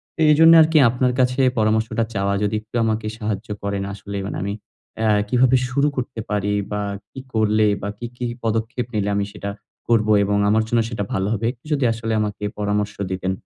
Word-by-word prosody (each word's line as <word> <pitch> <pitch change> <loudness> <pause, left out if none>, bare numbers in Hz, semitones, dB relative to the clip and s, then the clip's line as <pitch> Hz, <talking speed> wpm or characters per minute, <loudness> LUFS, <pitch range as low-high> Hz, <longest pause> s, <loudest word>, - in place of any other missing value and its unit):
তো - - -20
এজন্য 165 +2 +7
আরকি, 160 0 +4
আপনার 125 +1 +1
কাছে 125 +1 +2 0.2
পরামর্শটা 110 +1 +1
চাওয়া। 100 0 0
যদি 105 +1 0
একটু 110 +2 -14
আমাকে 110 -1 -1
সাহায্য 105 -1 -3 0.2
করেন। 100 -1 -2
আসলে 100 0 -7
মানে, 100 - -4
আমি 100 +1 -2 0.5
অ্যা 110 -1 +2 0.2
কিভাবে 125 +2 +4
শুরু 140 +3 +2
করতে 125 -2 -4
পারি, 105 0 0 0.2
বা 105 - -1 0.3
কি - - -8
করলে 110 -1 +3
বা 100 - -3
কি, 120 - -6
কি 125 - -3 0.2
পদক্ষেপ 115 +3 -1
নিলে 105 -1 0
আমি 100 0 0
সেটা 100 - -6 0.4
করবো 110 -2 +3
এবং 100 +1 +1
আমার 110 +1 +3
জন্য 120 - +2
সেটা 110 -3 -3
ভালো 95 0 0
হবে? 115 0 -2
একটু 120 - -32
যদি 140 -3 +1
আসলে 115 0 -3
আমাকে 105 -1 -4 0.2
পরামর্শ 105 0 -1 0.2
দিতেন। 95 0 -2
110 Hz, 190 wpm, -21 LUFS, 105-120 Hz, 0.5 s, এজন্য